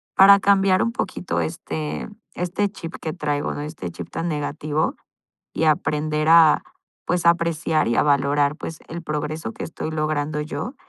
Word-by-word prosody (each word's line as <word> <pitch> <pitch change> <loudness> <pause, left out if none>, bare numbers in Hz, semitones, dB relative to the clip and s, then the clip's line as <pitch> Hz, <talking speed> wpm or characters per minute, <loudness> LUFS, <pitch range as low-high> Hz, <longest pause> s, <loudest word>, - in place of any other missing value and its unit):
para 200 +1 +8
cambiar 195 -1 +4
un 230 - 0
poquito 190 -5 -3
este 155 0 -4 0.3
este 180 +3 -1
chip 165 -4 -8
que 155 - -3
traigo, 150 -4 -2
¿no?, 145 - -5
este 150 - -6
chip 85 0 -8
tan 170 - -3
negativo 150 0 -2 0.6
y - - -1
aprender 155 0 +1
a, 165 -2 +6 0.4
pues 175 -1 0
a - - +8
apreciar 165 -4 0
y 120 - +1
a - - +4
valorar, 145 0 +2
pues 165 -1 -7
el 170 +1 -7
progreso 150 -5 -3
que - - -7
estoy 160 - -5
logrando 155 -1 -1
yo, 195 - -5
155 Hz, 165 wpm, -22 LUFS, 150-170 Hz, 0.6 s, para